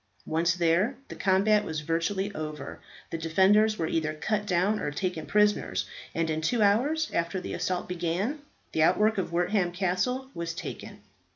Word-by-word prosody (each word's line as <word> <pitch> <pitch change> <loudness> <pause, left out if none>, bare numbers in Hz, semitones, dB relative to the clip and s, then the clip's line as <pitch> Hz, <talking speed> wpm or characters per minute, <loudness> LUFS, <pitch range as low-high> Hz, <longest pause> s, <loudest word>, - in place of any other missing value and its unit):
Once 165 +2 +1
there, 180 +8 +2
the - - -7
combat 205 +2 +3
was 155 -1 -4
virtually 180 +6 -1
over. 155 -4 -6 0.3
The 165 - -3
defenders 195 +7 +4
were 165 - -1
either 155 -1 -1
cut 210 +6 -1
down 190 +3 +2
or - - -2
taken 165 +1 -3
prisoners, 205 - +2 0.3
and 165 0 +1
in 155 0 -1
two 220 +7 +1
hours 280 +11 +2
after 170 +3 -1
the - - -6
assault 180 -1 -2
began, 180 - -2 0.3
the 160 - 0
outwork 210 +6 +3
of 185 - -3
Wortham 175 +1 +1
Castle 190 +9 -1
was 170 0 -4
taken. - - -7
180 Hz, 165 wpm, -28 LUFS, 165-210 Hz, 0.3 s, defenders